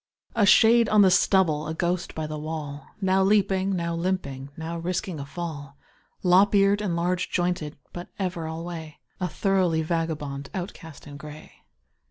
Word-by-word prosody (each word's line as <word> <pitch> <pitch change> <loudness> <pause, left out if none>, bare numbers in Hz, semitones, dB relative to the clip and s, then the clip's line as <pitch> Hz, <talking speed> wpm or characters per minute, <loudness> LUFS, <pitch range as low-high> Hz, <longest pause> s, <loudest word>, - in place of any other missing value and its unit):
A 210 -3 +3
shade 230 +2 +6
on 210 -1 +6
the 190 - +5
stubble, 175 -5 +3
a 160 - -3
ghost 175 +1 -2
by 160 - -3
the 155 0 -5
wall, 150 -2 -6
Now 190 0 +3
leaping, 195 -1 +2
now 170 -1 -2
limping, 165 -6 -3
now 165 +1 -5
risking 180 -1 -3
a 140 - -6
fall, 145 -3 -7 0.5
Lop 190 +3 +5
eared 200 +1 +4
and 190 -5 -1
large 175 +1 -1
jointed, 175 -4 -1 0.2
but 175 0 -7
ever 180 -4 -3
alway 160 -1 -6 0.2
A 180 - -1
thoroughly 180 -3 +1
vagabond 155 -4 -3
outcast 175 -4 -7
in 145 -1 -9
gray. 150 +1 -11
170 Hz, 160 wpm, -25 LUFS, 155-190 Hz, 0.5 s, shade